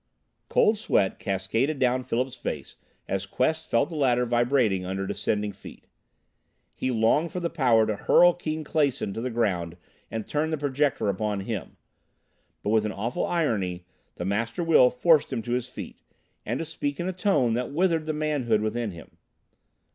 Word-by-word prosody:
Cold 215 0 +3
sweat 100 - +1
cascaded 110 +10 -1
down 130 -1 +2
Philip's 125 +1 -2
face 75 - -5 0.3
as 95 0 -2
Quest 160 +9 -1
felt 120 +6 +2
the - - -5
ladder 125 -4 +2
vibrating 120 -5 +2
under 95 +1 -3
descending 105 +1 -1
feet. 100 - -13 0.9
He 130 - -2
longed 125 +8 +2
for 180 - -3
the 170 -1 -2
power 125 -9 +4
to 110 -1 -1
hurl 175 - +5
Keane 155 -2 -4
Clason 140 -9 0
to 115 - -4
the 130 - -2
ground 90 -8 -1 0.3
and 110 -2 -4
turn 155 +1 -1
the 160 - -1
Projector 145 -4 0
upon 100 +1 -1
him. 100 -1 -5 0.9
But 105 - 0
with 110 -1 +3
an 105 - -2
awful 110 +5 -2
irony 100 - -1 0.3
the 90 - -5
Master 115 - -1
Will 160 -7 +6
forced 155 +5 +3
him 115 - -2
to 120 - -5
his 125 0 -1
feet, 125 - -9 0.5
and 120 +4 -1
to 165 - -3
speak 145 -2 -4
in 175 - -2
a 185 - -2
tone 160 - +2
that 125 +3 -2
withered 165 0 +1
the 155 - 0
manhood 145 -8 0
within 110 +1 -1
him. 85 -4 -12
125 Hz, 175 wpm, -26 LUFS, 105-150 Hz, 0.9 s, Will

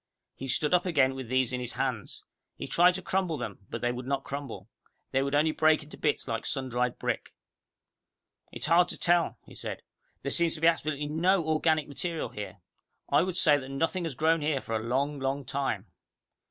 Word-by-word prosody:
He 135 - -7
stood 145 +5 +1
up 180 +1 +3
again 140 -6 +3
with 130 -3 -7
these 130 -1 +1
in 125 - -1
his 125 -1 -5
hands. - - -3 0.3
He - - -6
tried 180 +1 +4
to 190 - -5
crumble 185 -5 0
them, 115 -6 -5
but - - -5
they 120 - +1
would 125 +1 -6
not 135 0 0
crumble. 135 -9 -6 0.4
They 135 - +2
would 140 +1 0
only 155 +2 +4
break 155 0 +3
into 150 - -11
bits 150 -3 0
like 115 -3 -2
sun 135 -3 -2
dried 125 0 0
brick. - - -3 1.2
"It's - - -4
hard 175 +3 +5
to - - -4
tell," 175 -1 +2
he - - -14
said. - - -6 0.4
"There 140 - -1
seems 170 -1 +3
to 155 - -8
be - - +3
absolutely 155 -3 +1
no 170 +4 +2
organic 155 -1 +2
material 165 +3 -3
here. 105 -1 -7 0.5
I - - +5
would 180 0 -1
say 150 -5 +5
that 135 -1 -8
nothing 165 +6 -1
has 155 -5 -4
grown 160 +3 +2
here 150 -2 +1
for 115 - -4
a - - +1
long, 140 +5 0
long 135 +1 -2
time. 135 -9 -2
145 Hz, 205 wpm, -29 LUFS, 130-165 Hz, 1.2 s, hard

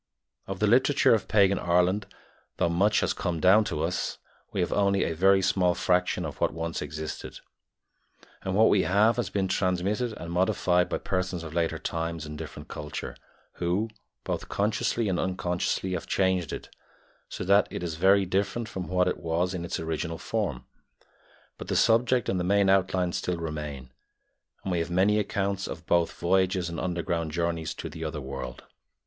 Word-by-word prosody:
Of 95 - -4
the 105 - +1
literature 130 +6 +4
of 110 - 0
pagan 100 -3 +4
Ireland, 90 +3 +2 0.5
though 85 - +2
much 100 +5 +3
has - - +1
come 85 -3 -2
down 95 +6 +6
to 75 -6 -2
us, 85 +2 -2 0.3
we - - -3
have 90 - 0
only 100 -1 +2
a - - -1
very 95 +3 +4
small 90 -2 +2
fraction 90 -1 +1
of - - -7
what - - +2
once 80 0 -3
existed, 75 +1 -6 1.0
and 95 0 -2
what 110 +2 +6
we 100 - +4
have 105 +5 +3
has - - -1
been 95 -2 0
transmitted 95 +5 0
and 85 -5 -7
modified 90 -1 +2
by - - -1
persons 90 -2 -2
of 80 -1 -8
later 85 -1 0
times 80 -1 -3
and 75 0 -7
different 75 0 -8
culture, 75 - -6 0.4
who, 90 +6 0 0.3
both - - -4
consciously 105 +2 0
and 95 -3 0
unconsciously, 90 0 -1
have 90 - -3
changed 95 -4 +1
it, - - -6 0.6
so - - -5
that 100 +2 +4
it - - -5
is 85 -2 -3
very 95 +4 +4
different 100 +5 -1
from 95 -5 -5
what 90 0 +2
it 90 - 0
was 85 +3 -1
in 90 -2 -4
its 85 - -3
original 80 0 -3
form; 100 - -3 0.9
but - - -7
the - - -1
subject 120 +1 +3
and 95 - 0
the - - -1
main 100 +1 +3
outlines 95 -2 +1
still 90 -1 -2
remain, 75 -5 -5 0.7
and 95 - -3
we 90 - +1
have 85 +1 -2
many 95 +4 +3
accounts 100 -1 -1
of - - -7
both 85 -1 +2
voyages 95 0 +1
and 85 - -5
underground 85 -2 -2
journeys 85 0 -2
to - - -6
the 80 +1 -7
other 75 -1 -3
world. 65 -2 -6
90 Hz, 180 wpm, -27 LUFS, 85-100 Hz, 1.0 s, down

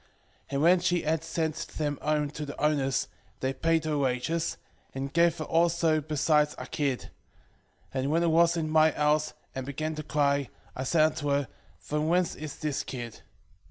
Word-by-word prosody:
2:12 - - -32 0.4
And 140 0 -1
when 175 +2 +6
she 175 0 +1
had 160 +1 0
sent 160 -1 -1 0.2
them 145 -2 -1
home 150 -1 0
to 150 - -6
the 145 -1 -7
owners, 140 -3 +1 0.3
they 130 +1 -1
paid 160 +4 +1
her 150 -2 0
wages, 140 +5 -1 0.4
and 135 0 -4
gave 170 0 +4
her 155 - -3
also 165 -1 +2
besides 150 0 +2
a - - -6
kid. 140 -4 -2 0.8
2:13 135 - -1
And 135 - -1
when 165 +3 +2
it 170 - +3
was 170 +1 +4
in 160 -1 -1
my 155 0 +5
house, 150 0 +1 0.2
and 130 - -4
began 155 +4 -3
to 155 - -5
cry, 140 -2 +1 0.3
I 130 - -3
said 155 +3 +4
unto 155 -1 0
her, 140 -1 +1 0.3
From 150 +1 -2
whence 175 +1 +2
is 150 -2 -7
this 150 -3 -2
kid? 120 -3 -7
155 Hz, 190 wpm, -28 LUFS, 140-160 Hz, 0.8 s, when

